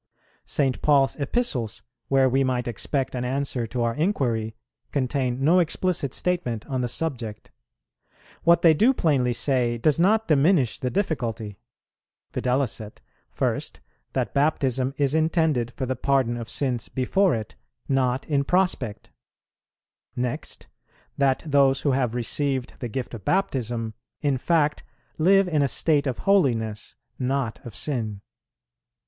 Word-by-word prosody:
St. 135 Hz, -3 st, 0 dB
Paul's 140 Hz, -2 st, +3 dB
Epistles, 130 Hz, -, -1 dB, 0.2 s
where 135 Hz, -1 st, +4 dB
we 135 Hz, +2 st, +2 dB
might 125 Hz, -2 st, -1 dB
expect 130 Hz, +4 st, -2 dB
an 125 Hz, -1 st, -2 dB
answer 130 Hz, -2 st, -2 dB
to 120 Hz, +1 st, -2 dB
our 115 Hz, 0 st, +1 dB
inquiry, 120 Hz, -, -1 dB, 0.4 s
contain 130 Hz, -2 st, -1 dB
no 170 Hz, +6 st, +5 dB
explicit 170 Hz, -4 st, 0 dB
statement 150 Hz, -12 st, -2 dB
on 130 Hz, -2 st, -2 dB
the 125 Hz, -, 0 dB
subject; 120 Hz, -6 st, -4 dB, 0.9 s
what 170 Hz, 0 st, +4 dB
they 165 Hz, -2 st, +7 dB
do 230 Hz, -, +3 dB
plainly 135 Hz, -, +2 dB
say 120 Hz, -1 st, 0 dB
does 150 Hz, +7 st, +2 dB
not 215 Hz, +5 st, +3 dB
diminish 150 Hz, -, +3 dB
the 125 Hz, -, -1 dB
difficulty: 115 Hz, -, -2 dB, 0.7 s
viz., 125 Hz, -3 st, 0 dB, 0.5 s
first, -, -, -2 dB, 0.3 s
that -, -, -1 dB
baptism 135 Hz, -2 st, +1 dB
is 140 Hz, -1 st, +1 dB
intended 160 Hz, -6 st, +1 dB
for 130 Hz, +2 st, -4 dB
the 130 Hz, +1 st, -2 dB
pardon 130 Hz, -2 st, +1 dB
of 115 Hz, -2 st, -6 dB
sins 125 Hz, -3 st, -1 dB
before 175 Hz, +6 st, +2 dB
it, 110 Hz, -2 st, -5 dB, 0.3 s
not 130 Hz, -1 st, 0 dB
in 140 Hz, -2 st, +1 dB
prospect; 180 Hz, -, 0 dB, 1.0 s
next, 125 Hz, -1 st, -4 dB, 0.5 s
that 135 Hz, -2 st, +1 dB
those 140 Hz, -3 st, +3 dB
who 145 Hz, -, +2 dB
have 125 Hz, -3 st, 0 dB
received 130 Hz, +2 st, -1 dB
the 120 Hz, -, -4 dB
gift 125 Hz, +3 st, -4 dB
of 110 Hz, -5 st, -7 dB
Baptism 120 Hz, -, -1 dB, 0.3 s
in 140 Hz, -4 st, 0 dB
fact 155 Hz, 0 st, +1 dB, 0.4 s
live 195 Hz, +4 st, +5 dB
in 155 Hz, -4 st, +1 dB
a 140 Hz, -, +3 dB
state 145 Hz, +2 st, +1 dB
of 125 Hz, -3 st, -2 dB
holiness, 115 Hz, -, +1 dB, 0.2 s
not 130 Hz, -2 st, -2 dB
of 120 Hz, -5 st, -9 dB
sin. 110 Hz, -8 st, -2 dB
135 Hz, 135 wpm, -25 LUFS, 120-150 Hz, 1.0 s, they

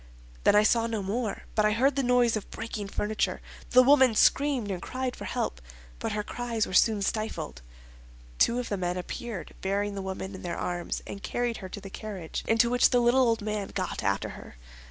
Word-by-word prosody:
Then -, -, +6 dB
I 210 Hz, -, +6 dB
saw 230 Hz, +1 st, +3 dB
no 220 Hz, -3 st, -2 dB
more; 215 Hz, +3 st, -2 dB
but 215 Hz, -, +2 dB
I 210 Hz, 0 st, +3 dB
heard 265 Hz, +5 st, +3 dB
the 275 Hz, -, +2 dB
noise 245 Hz, -2 st, +3 dB
of 215 Hz, -, -5 dB
breaking 210 Hz, -3 st, -5 dB
furniture. 210 Hz, +2 st, -1 dB, 0.3 s
The 255 Hz, +1 st, +7 dB
woman 260 Hz, -3 st, +6 dB
screamed, 270 Hz, -4 st, +3 dB
and 180 Hz, -2 st, -4 dB
cried 255 Hz, -1 st, -3 dB
for -, -, -8 dB
help; 65 Hz, -, -2 dB, 0.4 s
but -, -, -2 dB
her 210 Hz, 0 st, -1 dB
cries 235 Hz, -1 st, -2 dB
were -, -, -8 dB
soon 210 Hz, +1 st, +4 dB
stifled. 205 Hz, -, -3 dB, 0.8 s
Two 235 Hz, -, +4 dB
of 250 Hz, -1 st, -3 dB
the 205 Hz, -, -1 dB
men 180 Hz, -1 st, -2 dB
appeared, 205 Hz, +2 st, -6 dB
bearing 200 Hz, +1 st, -1 dB
the 200 Hz, -, -4 dB
woman 190 Hz, +1 st, -5 dB
in 190 Hz, -, -8 dB
their 175 Hz, -, -4 dB
arms, 175 Hz, -1 st, -3 dB
and 200 Hz, -, -7 dB
carried 240 Hz, +1 st, -2 dB
her 185 Hz, -, -8 dB
to 205 Hz, -, -7 dB
the 195 Hz, -1 st, -10 dB
carriage, 195 Hz, -7 st, -6 dB
into 225 Hz, +1 st, +4 dB
which 245 Hz, -, +5 dB
the 245 Hz, -, +3 dB
little 240 Hz, +2 st, +4 dB
old 225 Hz, -2 st, +1 dB
man 210 Hz, -2 st, -2 dB
got 185 Hz, -2 st, -2 dB
after 100 Hz, -, 0 dB
her. -, -, -11 dB
215 Hz, 210 wpm, -28 LUFS, 195-240 Hz, 0.8 s, The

